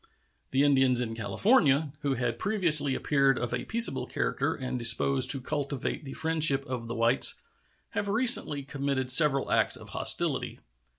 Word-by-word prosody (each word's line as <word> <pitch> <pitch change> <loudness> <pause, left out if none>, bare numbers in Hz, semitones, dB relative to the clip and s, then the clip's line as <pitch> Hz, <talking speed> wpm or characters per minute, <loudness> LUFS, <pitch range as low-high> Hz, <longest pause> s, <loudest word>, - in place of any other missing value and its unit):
The 135 +1 0
Indians 135 -3 +2
in 115 -2 -3
California, 145 - +1
who 140 -3 -3
had 120 -2 -4
previously 165 -9 +1
appeared 140 -2 0
of 120 0 -5
a 125 - -4
peaceable 230 +1 +2
character - - -3
and 130 -2 -6
disposed 120 +3 +1
to 135 - +2
cultivate 140 +1 -5
the 135 - -9
friendship 155 -4 +1
of 125 -3 -7
the 120 - -6
whites, 115 +3 +2 0.6
have 205 - -4
recently 205 - +3
committed 135 -2 -2
several 140 -1 +2
acts - - +1
of - - -13
hostility. - - +2
135 Hz, 155 wpm, -26 LUFS, 125-150 Hz, 0.6 s, recently